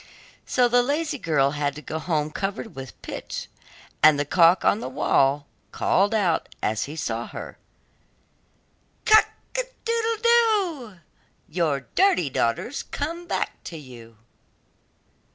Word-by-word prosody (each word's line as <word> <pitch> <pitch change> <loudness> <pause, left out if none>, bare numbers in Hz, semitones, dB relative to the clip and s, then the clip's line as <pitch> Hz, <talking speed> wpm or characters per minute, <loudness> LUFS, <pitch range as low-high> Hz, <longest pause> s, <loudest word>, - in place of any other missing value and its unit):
So 250 -1 +3
the 245 +1 +4
lazy 290 +3 -1
girl 140 -7 +2
had 145 -1 -2
to 150 - -8
go 160 - -4
home 155 -2 -1
covered 200 +5 -4
with 135 -2 -9
pitch, - - -6 0.5
and 155 -1 +6
the 145 - 0
cock 170 +4 +4
on 205 - +4
the 130 - -5
well 135 +2 +2 0.3
called 200 +3 +2
out 185 -6 +1
as 110 0 -1
she 145 - -8
saw 120 -6 -3
her: - - -9 1.5
'Cock 435 -1 +7 0.3
a - - +2 0.2
doodle 460 -1 0
doo! 400 - +2 0.5
Your 155 -5 0
dirty 345 - +3
daughter's 125 - -1
come 335 +4 -5
back - - -3
to 165 - -7
you. 120 -6 -13
175 Hz, 135 wpm, -24 LUFS, -, 1.5 s, Cock